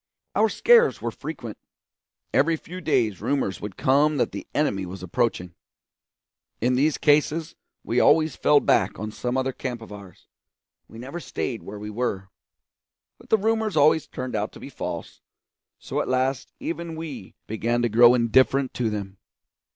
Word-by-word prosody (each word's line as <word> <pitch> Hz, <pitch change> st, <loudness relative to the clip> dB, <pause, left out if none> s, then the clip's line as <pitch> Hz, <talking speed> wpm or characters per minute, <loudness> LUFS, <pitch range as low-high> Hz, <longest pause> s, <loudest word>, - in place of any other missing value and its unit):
Our -, -, +4 dB
scares 475 Hz, -1 st, +4 dB
were -, -, -3 dB
frequent. -, -, -7 dB, 0.7 s
Every 165 Hz, -, +3 dB
few 180 Hz, +3 st, -9 dB
days 125 Hz, -, +1 dB
rumours 135 Hz, -9 st, -1 dB
would 105 Hz, -2 st, -7 dB
come 145 Hz, +3 st, +3 dB
that -, -, +1 dB
the -, -, -7 dB
enemy 125 Hz, -10 st, 0 dB
were 90 Hz, +1 st, -7 dB
approaching. 90 Hz, -1 st, -1 dB, 1.1 s
In 125 Hz, +3 st, +1 dB
these 145 Hz, +4 st, +2 dB
cases 150 Hz, +2 st, +2 dB, 0.3 s
we 120 Hz, -, 0 dB
always 155 Hz, +2 st, +4 dB
fell 145 Hz, -1 st, +4 dB
back -, -, +2 dB
on 110 Hz, 0 st, -5 dB
some 125 Hz, +3 st, -3 dB
other 130 Hz, 0 st, 0 dB
camp 125 Hz, -2 st, -5 dB
of 115 Hz, -2 st, -12 dB
ours; 100 Hz, -3 st, -12 dB, 0.6 s
we 115 Hz, -, -13 dB
never 135 Hz, +8 st, -7 dB
stayed 120 Hz, -8 st, -4 dB
where 105 Hz, -, -8 dB
we 105 Hz, +1 st, -7 dB
were. 105 Hz, -4 st, -3 dB, 0.9 s
But -, -, -18 dB
the 220 Hz, -, +5 dB
rumours 220 Hz, -2 st, 0 dB
always 150 Hz, +2 st, +4 dB
turned 130 Hz, -2 st, -5 dB
out 105 Hz, 0 st, -2 dB
to -, -, -12 dB
be -, -, -9 dB
false; -, -, -6 dB, 0.6 s
so -, -, -3 dB
at -, -, -4 dB
last 130 Hz, 0 st, 0 dB
even 170 Hz, -1 st, -5 dB
we 150 Hz, -, -8 dB
began 115 Hz, +2 st, -1 dB
to -, -, +3 dB
grow 120 Hz, +3 st, +7 dB
indifferent 130 Hz, +3 st, +3 dB
to 120 Hz, -3 st, -1 dB
them. 100 Hz, -2 st, -6 dB
125 Hz, 165 wpm, -24 LUFS, 110-150 Hz, 1.1 s, grow